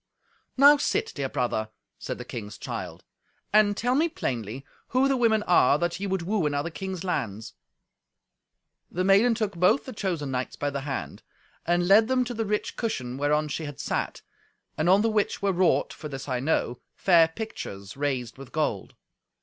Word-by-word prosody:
"Now 285 +2 +8
sit, 285 - 0
dear 140 -2 -3
brother," 110 -4 -1 0.3
said - - -5
the - - -8
king's 105 -2 -7
child, - - -6 0.5
"and 210 -1 +4
tell 245 +2 +1
me 315 +5 +2
plainly 125 - -4 0.2
who 255 +2 +2
the 275 - +2
women 225 -4 +3
are 160 -7 +4
that 175 +2 -2
ye 200 - -2
would 190 -2 -1
woo 190 -3 0
in 145 - -2
other 145 +4 -2
kings' 190 +1 -5
lands." 110 - -3 1.4
The 185 - -2
maiden 200 +5 +5
took 215 -4 -2
both 180 +10 +3
the 260 - -7
chosen 170 -9 -2
knights 125 0 -3
by 145 0 -2
the 140 0 -3
hand, 135 -1 -5 0.5
and 175 +1 +2
led 215 +3 +6
them 260 0 +2
to 245 - -4
the 225 -1 -2
rich 210 0 -2
cushion 130 - -3
whereon 150 +1 +1
she 155 +2 -4
had 145 -4 -8
sat, - - -3 0.5
and 155 +3 +1
on 195 +3 +5
the - - +3
which 210 -1 0
were 195 -1 +2
wrought 180 0 +2
(for 150 - -8
this 135 -1 -7
I 130 -2 -1
know) 125 -3 0 0.2
fair 170 -3 +5
pictures 105 - -7
raised 135 -4 -2
with 135 - -11
gold. 150 -11 -2
170 Hz, 185 wpm, -26 LUFS, 135-210 Hz, 1.4 s, Now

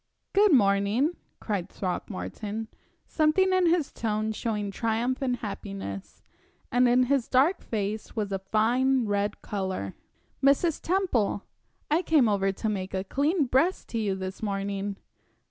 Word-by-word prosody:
"Good 410 0 +5
morning," 210 - +3 0.2
cried 195 -4 -3
Throckmorton 210 +3 -4 0.4
something 345 +5 +2
in 370 -1 +4
his 330 -3 +2
tone 215 -1 -1
showing 210 -2 -2
triumph 230 +5 -1
and 255 -2 +1
happiness, 195 - -7 0.5
and 245 +1 +4
in 250 +1 +5
his 260 -1 +1
dark 280 +9 +3
face 210 0 -3
was 210 -3 -2
a 195 - -1
fine 235 +6 +2
red 205 0 -1
color. 190 - -3 0.5
"Mrs. 285 +4 +3
Temple, 330 - 0 0.5
I 320 +3 +4
came 310 -8 +4
over 195 -2 +2
to 210 +3 -4
make 195 -3 -2
a 190 - -1
clean 290 - +1
breast 290 +9 +1
to 230 - -2
you 200 -3 0
this 190 0 -6
morning!" 200 -1 -2
220 Hz, 140 wpm, -27 LUFS, 200-270 Hz, 0.5 s, Good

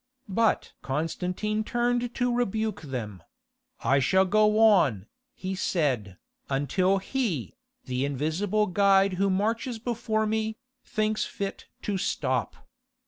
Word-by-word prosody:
But 225 +3 +1
Constantine 180 +9 -2
turned 240 +1 0
to 245 -1 +1
rebuke 220 -3 -1
them: 115 - -5 0.6
"I 135 +4 +3
shall 190 +8 +3
go 210 +2 +3
on," 175 - +4 0.3
he 190 0 -4
said, 130 - -1 0.3
"until 180 +8 +2
He, 195 - -2 0.3
the 125 +1 -1
invisible 160 +10 0
guide 195 0 +4
who 200 - +3
marches 225 +5 0
before 220 -1 -1
me, 220 0 -1 0.3
thinks 215 0 0
fit 200 -1 -5 0.2
to 200 -2 -1
stop." - - -2
195 Hz, 115 wpm, -27 LUFS, 150-220 Hz, 0.6 s, on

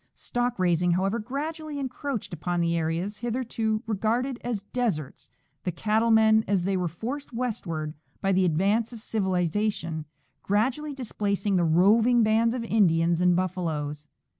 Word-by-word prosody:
Stock 245 0 -2
raising, 175 -1 +2
however, 195 +5 0
gradually 300 +6 -4
encroached 265 -5 -4
upon 175 +2 -2
the 170 0 +1
areas 165 +5 -2
hitherto 230 -2 -1
regarded 230 +4 -1
as 230 -5 -3
deserts, 205 - -3 0.3
the 180 - -1
cattle 220 +6 +1
men, 220 -1 +5
as 195 -3 +1
they 195 +1 0
were 180 -1 0
forced 245 - -6
westward 185 -11 -3 0.3
by 195 - +1
the 190 0 +3
advance 200 +8 +1
of 235 - -9
civilization, 185 -5 -1 0.4
gradually 260 +9 0
displacing 205 -5 -1
the 175 - +3
roving 220 +9 +4
bands 225 +2 +3
of 245 - -3
Indians 170 -6 +3
and 180 -1 +4
buffaloes. 160 -5 -2
205 Hz, 140 wpm, -26 LUFS, 175-235 Hz, 0.4 s, men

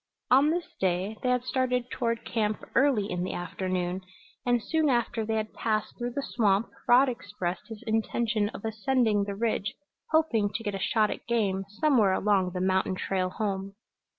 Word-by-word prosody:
On 275 +4 +6
this 345 +2 0
day 190 +3 0
they 250 - 0
had 250 -1 +2
started 250 -1 0
toward 230 -1 -1
camp 215 -2 -1
early 260 -6 +3
in 180 -1 -2
the 185 - -3
afternoon, 180 0 -2 0.5
and 245 0 +4
soon 315 -2 +1
after 240 -2 +1
they 220 +1 -1
had 220 0 -2
passed 215 -2 -1
through 240 0 -4
the 280 - -2
swamp 210 -3 +1 0.2
Rod 255 +3 +7
expressed 200 -7 -4
his 225 0 -9
intention 220 -1 0
of 210 - -8
ascending 220 -2 +1
the 200 0 -4
ridge, 205 -2 -1 0.3
hoping 280 -10 +2
to 225 - -2
get 205 -2 -2
a 195 - -3
shot 215 +2 +2
at - - -7
game 200 -5 0
somewhere 250 -11 +4
along 195 -2 +2
the 180 - -2
mountain 190 0 +1
trail 185 0 -1
home. 195 -1 -3
220 Hz, 180 wpm, -28 LUFS, 195-245 Hz, 0.5 s, Rod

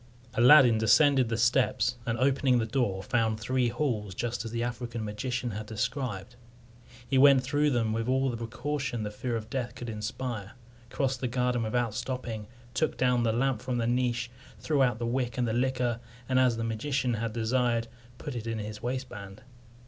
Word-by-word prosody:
Aladdin 125 -2 +7
descended 130 +2 +4
the 115 - -1
steps, 125 +1 +2
and, 115 0 0
opening 130 -1 +3
the 115 - +1
door, 110 -6 -1
found 110 +1 +1
the 110 - -10
three 130 +1 +1
halls 115 - -2
just 120 +1 -2
as 115 - -5
the 115 +1 -2
African 120 -1 -4
magician 120 +3 -3
had 105 +1 -6
described. 115 -1 -3 0.7
He 135 - +2
went 135 -1 +7
through 145 +3 +2
them 115 -5 +1
with 115 +2 -2
all 130 0 +2
the - - -4
precaution 125 +1 -3
the 105 - -4
fear 120 +3 -3
of 110 -1 -4
death 125 -2 -3
could 120 -2 -6
inspire, 110 -1 -4 0.4
crossed 135 -2 -1
the 130 - 0
garden 125 0 0
without 115 0 0
stopping, 120 -3 -4 0.3
took 155 +5 0
down 125 -1 +2
the 115 -1 +2
lamp 125 0 0
from 125 -1 -2
the 115 - 0
niche, 120 0 0 0.3
threw 135 +6 0
out 125 -4 +3
the 120 - -3
wick 120 0 -1
and 125 -1 +1
the 110 - -1
liquor, 125 -1 0 0.3
and, 130 -1 +2
as 125 -3 +3
the 115 - -2
magician 125 +3 -1
had 115 0 -2
desired, 115 0 +1 0.3
put 145 - -6
it 115 -1 -5
in 115 -1 -2
his 105 0 -6
waistband. 120 -6 -5
120 Hz, 190 wpm, -29 LUFS, 115-130 Hz, 0.7 s, Aladdin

